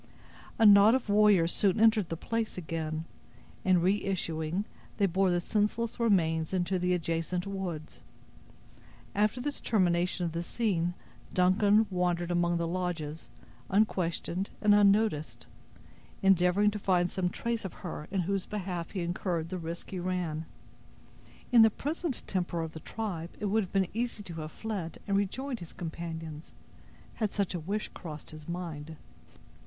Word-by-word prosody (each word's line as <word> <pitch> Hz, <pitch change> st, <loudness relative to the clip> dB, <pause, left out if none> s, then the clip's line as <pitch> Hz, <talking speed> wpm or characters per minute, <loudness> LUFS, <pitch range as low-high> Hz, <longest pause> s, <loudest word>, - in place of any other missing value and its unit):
A 225 Hz, -, +4 dB
knot 205 Hz, +3 st, +8 dB
of 260 Hz, -5 st, -2 dB
warriors 205 Hz, -5 st, +5 dB
soon 200 Hz, 0 st, +2 dB
entered 220 Hz, -4 st, +4 dB
the 165 Hz, -, -3 dB
place 225 Hz, +3 st, -2 dB
again, 160 Hz, -2 st, -3 dB, 0.6 s
and 185 Hz, -2 st, +4 dB
reissuing, 180 Hz, -2 st, 0 dB, 0.3 s
they 200 Hz, -, +3 dB
bore 190 Hz, +1 st, +2 dB
the 175 Hz, 0 st, +2 dB
senseless 215 Hz, +5 st, -1 dB
remains 165 Hz, -7 st, +2 dB
into 180 Hz, +1 st, 0 dB
the 180 Hz, 0 st, +2 dB
adjacent 170 Hz, +2 st, -2 dB
woods. 185 Hz, -6 st, -5 dB, 1.1 s
After 210 Hz, +4 st, +1 dB
this 285 Hz, +3 st, -3 dB
termination 180 Hz, -3 st, +1 dB
of 165 Hz, -, -2 dB
the 170 Hz, +1 st, -2 dB
scene, 175 Hz, -3 st, 0 dB, 0.4 s
Duncan 200 Hz, +4 st, +4 dB
wandered 175 Hz, -1 st, 0 dB
among 175 Hz, 0 st, +2 dB
the 170 Hz, -, 0 dB
lodges, 165 Hz, -3 st, -3 dB, 0.4 s
unquestioned 190 Hz, -2 st, 0 dB
and 210 Hz, -1 st, +5 dB
unnoticed, 205 Hz, -6 st, +3 dB, 0.8 s
endeavoring 195 Hz, +2 st, +4 dB
to 210 Hz, -, -4 dB
find 180 Hz, -3 st, +2 dB
some 185 Hz, -2 st, 0 dB
trace 235 Hz, +4 st, -2 dB
of 190 Hz, -, -5 dB
her 155 Hz, -3 st, -5 dB
in 195 Hz, -1 st, 0 dB
whose 195 Hz, +2 st, -1 dB
behalf 180 Hz, -5 st, -4 dB
he 190 Hz, -, -2 dB
incurred 170 Hz, -1 st, -2 dB
the 185 Hz, -, -4 dB
risk 165 Hz, +1 st, -6 dB
he 185 Hz, -, -3 dB
ran. 175 Hz, -3 st, -2 dB, 1.1 s
In 240 Hz, -2 st, +8 dB
the 225 Hz, -, +8 dB
present 300 Hz, -, -3 dB
temper 175 Hz, -3 st, -1 dB
of 160 Hz, -1 st, -4 dB
the 160 Hz, -, -8 dB
tribe 175 Hz, -3 st, -4 dB
it 210 Hz, -, -3 dB
would 210 Hz, +2 st, +2 dB
have 185 Hz, -, -6 dB
been 195 Hz, -1 st, +2 dB
easy 230 Hz, -1 st, -2 dB
to 170 Hz, -4 st, -6 dB
have 155 Hz, 0 st, -6 dB
fled 195 Hz, -6 st, -5 dB
and 200 Hz, -, 0 dB
rejoined 240 Hz, +6 st, -1 dB
his 170 Hz, -, -10 dB
companions, 165 Hz, -2 st, -6 dB, 0.7 s
had 215 Hz, -2 st, +1 dB
such 200 Hz, -3 st, -1 dB
a 175 Hz, -, -2 dB
wish 200 Hz, +7 st, -3 dB
crossed 155 Hz, -4 st, -9 dB
his 155 Hz, +1 st, -10 dB
mind. 160 Hz, -3 st, -5 dB
180 Hz, 155 wpm, -30 LUFS, 170-205 Hz, 1.1 s, knot